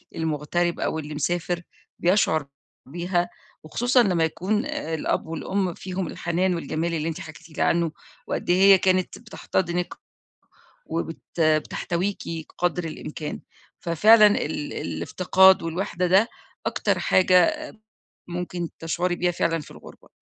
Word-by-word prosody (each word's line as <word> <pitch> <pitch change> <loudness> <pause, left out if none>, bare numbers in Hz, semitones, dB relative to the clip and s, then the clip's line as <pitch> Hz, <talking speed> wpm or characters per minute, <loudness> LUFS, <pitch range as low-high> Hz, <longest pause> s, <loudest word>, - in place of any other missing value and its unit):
المُغترب 160 +2 -1
أو 160 - -1
اللي 150 0 -6
مسافر، 175 +3 -1 0.4
بيشعر 170 -5 +2 0.4
بيها 175 +4 -1 0.3
وخصوصًا 245 +10 +3
لمّا 180 -6 +2
يكون 195 - 0
الأب 295 - -2
والأم 180 +3 -2
فيهم 185 0 -4
الحنان 175 +3 0
والجمال 170 0 -2
اللي 160 -1 -1
أنت 160 - -5
حكيتِ 160 +2 -11
لي - - +2
عنُّه، 170 -1 +2 0.4
وقد - - -3
إيه 175 - +4
هي 195 0 +9
كانت 185 0 +1
بتحتضنِك 180 -6 -2 0.9
وبت 165 +1 -5
بتحتويكِ 170 +4 0 0.4
قدر 175 0 0
الإمكان 155 -1 -6 0.4
ففعلًا 210 +6 +6
ال 155 -7 -1
الافتقاد 185 - +3
والوحدة 180 +2 -2
ده، 190 +5 +5 0.4
أكتر - - 0
حاجة 185 - +4 0.7
ممكن 175 -1 -4
تشعري 175 +2 -1
بيها 180 0 +1
فعلًا 165 -1 0
في 150 - -12
الغربة. - - -14
175 Hz, 120 wpm, -24 LUFS, 160-185 Hz, 0.9 s, هي